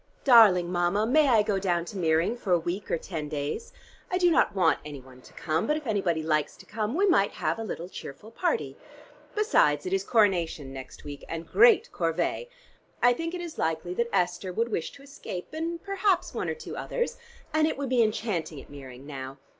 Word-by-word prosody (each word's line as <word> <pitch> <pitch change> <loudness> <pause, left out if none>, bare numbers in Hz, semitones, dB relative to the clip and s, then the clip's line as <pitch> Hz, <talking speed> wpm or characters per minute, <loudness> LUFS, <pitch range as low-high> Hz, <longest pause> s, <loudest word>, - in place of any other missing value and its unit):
Darling 205 -9 +6
Mama, 175 +4 +1
may 295 +5 +4
I 225 -5 +5
go 205 -2 0
down 175 -3 0
to 200 - -9
Meering 165 +5 +2
for 215 -6 -5
a - - +6
week 175 +4 -4
or - - +1
ten 160 -3 -6
days? 150 - -4 0.4
I 365 - 0
do 355 -1 +4
not 315 - +3
want 190 - +3
any 145 -2 -8
one 130 0 -16
to - - -17
come, 160 +1 -1
but 300 - +2
if 305 - -8
anybody 190 -8 0
likes 155 -1 0
to - - -15
come, 215 +3 -3
we 390 +4 +3
might 205 - +3
have - - -2
a - - -3
little 175 -5 -5
cheerful 190 +4 -10
party. 365 - -1 0.6
Besides 150 - +3
it 185 - -2
is 195 0 +1
Coronation 175 - +1
next 130 -1 -10
week, 145 -1 -8
and 165 0 -5
great 460 - +5
corvée! 485 - -1 0.6
I 245 0 +6
think 330 +7 -4
it 355 - -5
is 340 -2 -7
likely 160 +2 -1
that 235 +5 -1
Esther 180 +1 0
would 230 +6 -1
wish 170 -7 -2
to 275 - -14
escape 275 -10 -7
and 330 +2 -3
perhaps 395 -1 0
one - - -2
or - - -2
two 475 - -8
others, 480 -1 -3 0.4
and 310 0 +3
it 315 - -2
would 280 -2 -3
be 250 -2 +3
enchanting 205 -8 -1
at - - -14
Meering 135 -2 -11
now. 135 -2 -7
195 Hz, 210 wpm, -27 LUFS, -, 0.6 s, Darling